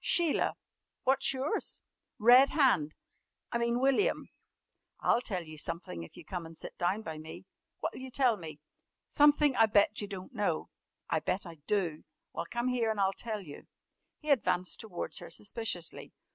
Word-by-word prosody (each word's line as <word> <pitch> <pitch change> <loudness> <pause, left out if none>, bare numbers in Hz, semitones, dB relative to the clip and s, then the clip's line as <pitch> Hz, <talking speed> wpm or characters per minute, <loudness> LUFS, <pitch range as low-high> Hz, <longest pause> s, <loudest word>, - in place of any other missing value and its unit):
"Sheila. 345 -5 +2 0.5
What's 270 +1 +3
yours?" 270 +2 -2 0.4
"Red 250 +5 +7
Hand 215 - +3 0.6
I 235 - 0
mean, 235 +1 +1
William." 275 - +2 0.7
"I'll 240 - +3
tell 190 -8 -3
you 155 -1 -9
sumpthin' 165 - -4
if 80 - -13
you'll - - -11
come 180 -2 -4
an' 165 - -12
sit - - -8
down 190 +5 0
by 160 -5 -6
me." 160 +4 -9 0.4
"What'll - - -3
you 260 0 -7
tell 255 -2 +3
me?" 160 -5 -9 0.5
"Sumpthin' 295 -1 +5
I 225 - +6
bet 210 0 +3
you 205 - -4
don't 190 -2 -8
know." 200 -7 -1 0.4
"I 160 - +1
bet 185 +5 -2
I 165 -3 -10
do." 175 -7 0 0.3
"Well, 170 - -4
come 240 +1 -1
here 240 -3 +1
an' 220 - -1
I'll 195 -1 +2
tell 220 -2 -4
you." 150 -6 -11 0.5
He 305 -1 -2
advanced 185 -8 +2
towards 200 -6 -3
her - - -9
suspiciously. 205 -5 -3
210 Hz, 170 wpm, -31 LUFS, 175-255 Hz, 0.7 s, Red